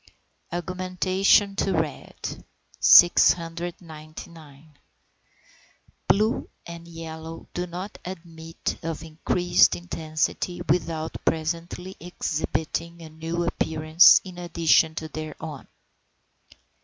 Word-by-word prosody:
AUGMENTATION 185 +3 +1
TO 195 -1 0
RED. 160 -3 -4 0.4
699. 165 -3 +2 1.3
Blue 215 +3 +2 0.2
and 170 0 -9
yellow 165 -1 -9
do 180 0 -3
not 180 +4 -7
admit 165 -2 -6
of 165 -1 -5
increased 165 +2 +2
intensity 165 0 -3
without 160 -1 -1
presently 170 +3 -3
exhibiting 170 0 -3
a 160 - -10
new 165 +2 -3
appearance 160 0 +5
in 180 -2 -10
addition 165 -2 +2
to 160 - -5
their 155 0 -7
own. 150 -4 -8
165 Hz, 85 wpm, -25 LUFS, 160-175 Hz, 1.3 s, appearance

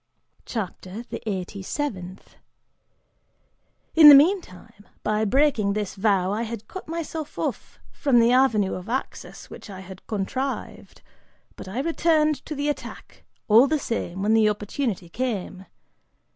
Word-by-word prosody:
CHAPTER 205 -1 -5
THE - - -5
EIGHTY 190 0 -4
SEVENTH. 190 -6 -5 1.6
"(In 315 -2 +10
the 290 - +12
meantime,) 280 - +1 0.2
by 215 +1 0
breaking 235 -4 +2
this 210 -2 -3
vow, 195 -2 +1
I 210 +3 -1
had 225 -2 -6
cut 375 - -9
myself 320 -2 -5
off - - -4
from 270 -5 +2
the 230 +1 +4
avenue 240 -7 +3
of 185 +4 -7
access 260 +3 -5
which - - -11
I 190 -1 -8
had 190 0 -12
contrived, 255 +6 -4 0.5
but - - -10
I 200 +7 -4
returned 310 -1 +1
to 305 - -4
the 285 +1 -2
attack, 295 - -6 0.2
all 225 +5 +6
the 310 +2 +1
same, 195 -8 -4
when 215 +2 +2
the 220 -1 +4
opportunity 210 -2 -3
came. 195 -3 -4
225 Hz, 140 wpm, -24 LUFS, 195-285 Hz, 1.6 s, the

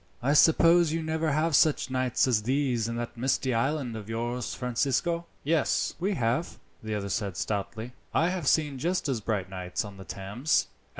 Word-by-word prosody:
"I 140 +3 +3
suppose 165 +2 +5
you 165 0 -1
never 160 0 -1
have 155 +2 +1
such 150 -3 +3
nights 130 -1 +1
as 115 -4 +2
these 125 -1 0
in 115 - -3
that 120 0 -4
misty 130 +1 0
island 130 0 -1
of 110 -1 -8
yours, 120 +1 -3
Francisco?" 140 +7 -1 0.2
"Yes, 155 0 +1
we 195 +3 0
have," 120 +4 -1 0.2
the 110 -1 -3
other 100 -1 -3
said 100 -3 -2
stoutly. 110 +3 -3 0.2
"I 165 - +2
have 180 -5 -3
seen 145 -3 +2
just 175 +4 0
as 130 -5 -1
bright 100 -3 -2
nights 90 +1 -4
on 100 -1 -10
the 95 - -9
Thames. 105 +11 -1
130 Hz, 180 wpm, -28 LUFS, 110-155 Hz, 0.2 s, suppose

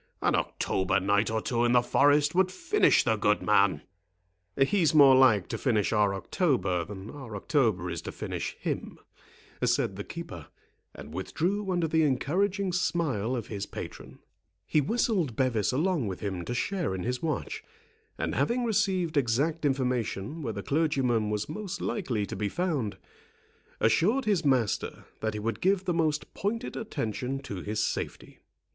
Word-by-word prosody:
An - - +3
October 95 -1 0
night 100 +3 +2
or 110 0 -1
two 120 -5 0
in 120 0 +3
the 125 -1 +5
forest 145 +3 +3
would 185 +1 +3
finish 360 - +3
the 110 -2 +1
good 105 0 +2
man." 100 -7 +3 0.7
"He's 160 +3 +3
more 140 -3 +8
like 125 -8 +5
to - - -3
finish 110 -5 +1
our 105 -2 +3
October 95 - 0
than 100 +1 -8
our 130 -7 -8
October 110 - +1
is 85 -2 -4
to - - -6
finish - - -5
him," - - -4 0.7
said - - +1
the - - -4
keeper; - - -8 0.5
and - - -10
withdrew 190 - -2
under 175 -2 +1
the 160 +1 +2
encouraging 185 +7 +1
smile 155 - 0
of 115 -4 -3
his 100 -2 -4
patron. - - -8 0.5
He 155 - +2
whistled 185 - 0
Bevis 115 -5 +1
along 155 - 0
with 95 -2 -4
him 95 -4 -3
to 120 - -3
share 175 - -1
in 90 - -4
his 125 +1 -2
watch; 160 -2 -3 0.5
and - - -2
having 245 +1 +1
received 190 -7 +1
exact 140 +6 +1
information 130 -1 -1
where 115 -6 -3
the 100 0 -5
clergyman 135 -8 +1
was 105 0 -2
most 205 -3 -5
likely 120 - -2
to - - -6
be 100 +1 -1
found, 150 - -2 0.8
assured 210 - +2
his 200 -6 +2
master 130 -7 0
that 110 -1 -2
he - - -3
would 110 0 -3
give 190 0 +2
the 180 - +1
most 155 -3 0
pointed 230 +5 -3
attention 135 - -3
to 100 -8 -6
his 105 +3 -1
safety. - - -4
135 Hz, 165 wpm, -28 LUFS, 105-175 Hz, 0.8 s, more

